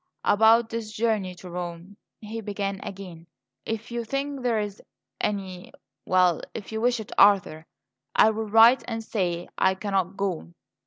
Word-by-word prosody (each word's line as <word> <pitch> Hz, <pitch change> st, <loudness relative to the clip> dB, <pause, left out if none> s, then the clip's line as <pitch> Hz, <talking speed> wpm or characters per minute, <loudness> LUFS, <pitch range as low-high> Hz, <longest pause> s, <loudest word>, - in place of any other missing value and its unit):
"About 225 Hz, +2 st, +4 dB
this 225 Hz, -2 st, -4 dB
journey 215 Hz, -4 st, -1 dB
to 180 Hz, +1 st, -11 dB
Rome," 175 Hz, +2 st, -6 dB, 0.3 s
he 225 Hz, +1 st, -6 dB
began 200 Hz, -2 st, -3 dB
again; 180 Hz, -4 st, -9 dB, 0.4 s
"if 225 Hz, +2 st, -4 dB
you 235 Hz, 0 st, -2 dB
think 275 Hz, +3 st, -3 dB
there 240 Hz, -2 st, +1 dB
is 205 Hz, -1 st, -5 dB, 0.4 s
any 190 Hz, -3 st, -3 dB, 0.4 s
well 180 Hz, -2 st, +3 dB
if 215 Hz, -, -7 dB
you 220 Hz, 0 st, -3 dB
wish 245 Hz, 0 st, +2 dB
it, 215 Hz, -, -8 dB
Arthur, 190 Hz, -6 st, +4 dB, 0.5 s
I 220 Hz, -, +6 dB
will 220 Hz, 0 st, -4 dB
write 225 Hz, +4 st, +6 dB
and 225 Hz, -1 st, -4 dB
say 175 Hz, -6 st, -2 dB
I 190 Hz, 0 st, +3 dB
cannot 195 Hz, -1 st, -2 dB
go." 180 Hz, -4 st, -3 dB
205 Hz, 155 wpm, -25 LUFS, 185-225 Hz, 0.5 s, I